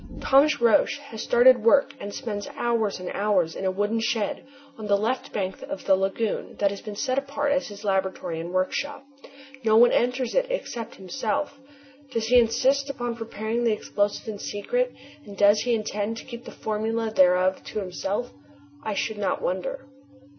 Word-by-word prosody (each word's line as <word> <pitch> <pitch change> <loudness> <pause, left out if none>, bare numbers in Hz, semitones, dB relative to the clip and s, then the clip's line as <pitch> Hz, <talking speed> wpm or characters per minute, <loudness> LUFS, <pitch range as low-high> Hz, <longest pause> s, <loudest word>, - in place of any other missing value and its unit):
Thomas 285 +3 +4
Roch 240 +5 +4
has 280 -6 -9
started 245 -1 +5
work 280 +4 +4
and 200 - -6
spends 205 -4 -5
hours 230 -5 0
and 180 - -5
hours 195 -5 +1
in 195 - -4
a - - +3
wooden 205 +4 0
shed 225 -2 -1 0.3
on 215 -4 -7
the 200 0 +4
left 230 +6 -2
bank 190 -2 -3
of 290 +1 -7
the 190 - +5
lagoon 195 +3 -2
that 200 -1 +1
has 200 - -7
been 210 -2 -7
set 255 +4 0
apart 285 +1 -2
as 275 -1 +1
his 205 -1 -10
laboratory 190 -4 -1
and 170 +2 -5
workshop. 275 +10 -2 0.6
No 220 -1 +4
one 240 +1 +7
enters 250 0 +1
it - - +2
except 240 - -4
himself. 275 +8 -3 0.5
Does 230 -3 -2
he 250 0 +7
insist 260 +4 +2
upon 240 -3 -3
preparing 225 0 -3
the 230 -2 +3
explosive 205 +1 -1
in 210 -2 -5
secret - - -1 0.3
and 200 -6 -11
does 205 +1 +5
he 245 -1 +1
intend 215 0 -2
to - - -9
keep 240 -1 -9
the - - -8
formula 220 +1 -2
thereof 185 -1 +4
to - - -4
himself? 195 +5 -3 0.5
I 215 -2 -3
should 215 +1 -2
not 200 - 0
wonder. 190 +9 -3
225 Hz, 180 wpm, -25 LUFS, 205-255 Hz, 0.6 s, one